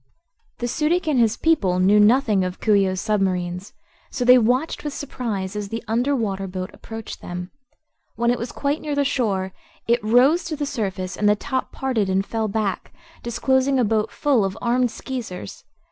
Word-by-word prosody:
The 240 Hz, -, -2 dB
Su 300 Hz, +5 st, 0 dB
dic 350 Hz, 0 st, +1 dB
and 290 Hz, -5 st, +2 dB
his 225 Hz, -1 st, +3 dB
people 215 Hz, -, +2 dB
knew 195 Hz, +3 st, +4 dB
nothing 215 Hz, -2 st, +4 dB
of 185 Hz, 0 st, -4 dB
Coo 215 Hz, -, +2 dB
ee 200 Hz, -1 st, +4 dB
oh's 185 Hz, 0 st, -2 dB
submarines, 185 Hz, -3 st, -1 dB, 0.4 s
so 245 Hz, -, -3 dB
they 250 Hz, +1 st, +8 dB
watched 250 Hz, +7 st, 0 dB
with 295 Hz, -2 st, -4 dB
surprise 215 Hz, -9 st, -4 dB
as 205 Hz, -1 st, -4 dB
the 225 Hz, +2 st, -4 dB
under 245 Hz, +6 st, +1 dB
water 195 Hz, -5 st, -2 dB
boat 185 Hz, 0 st, -5 dB
approached 225 Hz, -1 st, -8 dB
them. 180 Hz, +1 st, -6 dB, 0.6 s
When 235 Hz, 0 st, +2 dB
it 245 Hz, -, -1 dB
was 235 Hz, +1 st, -4 dB
quite 285 Hz, +2 st, -2 dB
near 295 Hz, -2 st, -3 dB
the 285 Hz, 0 st, +1 dB
shore 200 Hz, -9 st, -1 dB, 0.3 s
it 235 Hz, 0 st, +2 dB
rose 255 Hz, +10 st, +4 dB
to 325 Hz, -2 st, -3 dB
the 295 Hz, 0 st, -2 dB
surface 190 Hz, -8 st, -3 dB
and 205 Hz, +2 st, +2 dB
the 210 Hz, -, +4 dB
top 260 Hz, +5 st, -3 dB
parted 240 Hz, -7 st, -1 dB
and 190 Hz, +1 st, +1 dB
fell 220 Hz, 0 st, -2 dB
back, 205 Hz, -2 st, -2 dB, 0.3 s
disclosing 265 Hz, +3 st, +1 dB
a -, -, +4 dB
boat 215 Hz, 0 st, +1 dB
full 275 Hz, -7 st, +1 dB
of 195 Hz, 0 st, -2 dB
armed 245 Hz, +1 st, +1 dB
Skeezers. 230 Hz, -, -7 dB
225 Hz, 190 wpm, -22 LUFS, 195-260 Hz, 0.6 s, they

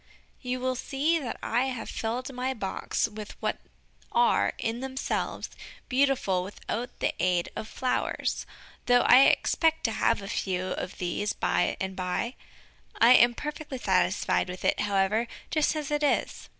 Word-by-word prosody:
You 250 Hz, 0 st, -2 dB
will 255 Hz, 0 st, 0 dB
see 285 Hz, +6 st, 0 dB
that 260 Hz, -6 st, -5 dB
I 245 Hz, +3 st, +1 dB
have 250 Hz, -4 st, -4 dB
filled 245 Hz, +4 st, -3 dB
my 255 Hz, +1 st, -2 dB
box 200 Hz, +1 st, -1 dB
with 215 Hz, -1 st, -9 dB
what -, -, -2 dB, 0.5 s
are, 240 Hz, 0 st, +3 dB
in 225 Hz, +1 st, -2 dB
themselves, 265 Hz, +1 st, -3 dB, 0.4 s
beautiful 255 Hz, -8 st, +2 dB
without 210 Hz, +5 st, -5 dB
the -, -, 0 dB
aid 180 Hz, -1 st, +1 dB
of 220 Hz, -, -5 dB
flowers, 255 Hz, +2 st, -2 dB, 0.4 s
though 245 Hz, 0 st, +6 dB
I 260 Hz, +2 st, +7 dB
expect 320 Hz, -1 st, +2 dB
to 225 Hz, -, +1 dB
have 220 Hz, -1 st, +1 dB
a -, -, -6 dB
few 185 Hz, -2 st, -2 dB
of 180 Hz, -, -4 dB
these 185 Hz, +4 st, -1 dB
by -, -, 0 dB
and 190 Hz, 0 st, -3 dB
by. 185 Hz, +6 st, -2 dB, 0.7 s
I 230 Hz, +2 st, +7 dB
am 240 Hz, -1 st, +6 dB
perfectly 295 Hz, -1 st, -5 dB
satisfied 190 Hz, -3 st, +1 dB
with 180 Hz, +1 st, -6 dB
it, -, -, +2 dB
however, 205 Hz, +3 st, +1 dB, 0.2 s
just 310 Hz, 0 st, +2 dB
as 300 Hz, -2 st, -4 dB
it 295 Hz, 0 st, +1 dB
is. 295 Hz, -, 0 dB
240 Hz, 155 wpm, -28 LUFS, 195-265 Hz, 0.7 s, I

